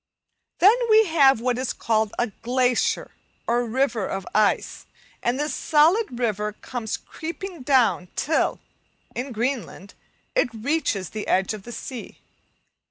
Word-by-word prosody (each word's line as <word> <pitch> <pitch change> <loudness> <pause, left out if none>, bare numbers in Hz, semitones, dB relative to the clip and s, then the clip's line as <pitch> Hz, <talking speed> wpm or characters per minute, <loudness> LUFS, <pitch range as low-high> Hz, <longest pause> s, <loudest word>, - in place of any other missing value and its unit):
Then 395 +5 +7 0.2
we 440 0 +7
have 280 - +5
what 250 0 0
is 260 -1 -2
called 220 -2 0
a 240 -2 0
"glacier," 250 0 +1 0.3
or 240 +1 +1
river 235 -3 0
of 195 -1 -4
ice, 210 -1 +1 0.3
and 245 +3 0
this 295 -1 -1
solid 315 - +3
river 210 -3 -1
comes 225 0 -5
creeping 340 +1 -7
down 250 -8 +2
till, 315 +1 0 0.5
in 255 +3 -4
Greenland, 230 -4 -3 0.4
it - - +2
reaches 225 - -1
the 215 -1 -5
edge 190 +3 +2
of 215 - -7
the 240 - -8
sea. 245 0 -7
245 Hz, 135 wpm, -24 LUFS, 220-285 Hz, 0.5 s, Then